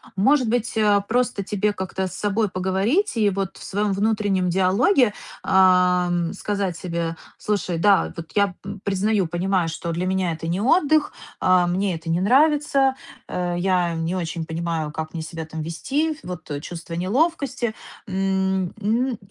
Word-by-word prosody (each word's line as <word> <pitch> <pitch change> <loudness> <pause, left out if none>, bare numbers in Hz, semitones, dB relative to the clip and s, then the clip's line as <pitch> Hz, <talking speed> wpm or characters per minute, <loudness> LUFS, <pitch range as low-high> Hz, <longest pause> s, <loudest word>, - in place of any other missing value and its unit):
Может 250 +4 +3
быть, 245 0 0
э, 210 -2 +4
просто 245 -3 0
тебе 210 +1 0
как-то 190 0 -3
с - - -8
собой 205 +1 0
поговорить 195 - 0
и 210 -2 +3
вот 195 -1 -3
в - - -11
своём 205 0 -1
внутреннем 200 -3 +1
диалоге, 205 - +3 0.3
э, 180 -2 +3
сказать 200 -4 -2
себе: 170 -2 -3 0.2
"Слушай, 190 -5 -1
да, 200 +3 +3
вот 165 -1 -8
я 200 -3 +2 0.3
признаю, 200 -1 +1
понимаю, 175 +1 0
что 170 +1 -4
для 175 +2 -2
меня 185 -2 0
это 165 0 -5
не 175 +4 -1
отдых, 310 +3 +3 0.3
а, 180 -1 +4
мне 185 +1 0
это 165 +1 -7
не 170 +2 +1
нравится, 275 +3 +3 0.3
а, 175 -1 -2
я 180 -1 +1
не 165 +2 -2
очень 165 -2 -3
понимаю, 160 -1 -3
как 155 +1 -5
мне 165 - -4
себя 160 0 -6
там 160 0 -6
вести, 285 - -2
вот 180 -4 -8
чувство 170 0 -8
неловкости". 240 - 0 0.3
Н 190 -1 0
н 235 +3 0
190 Hz, 155 wpm, -23 LUFS, 175-215 Hz, 0.3 s, э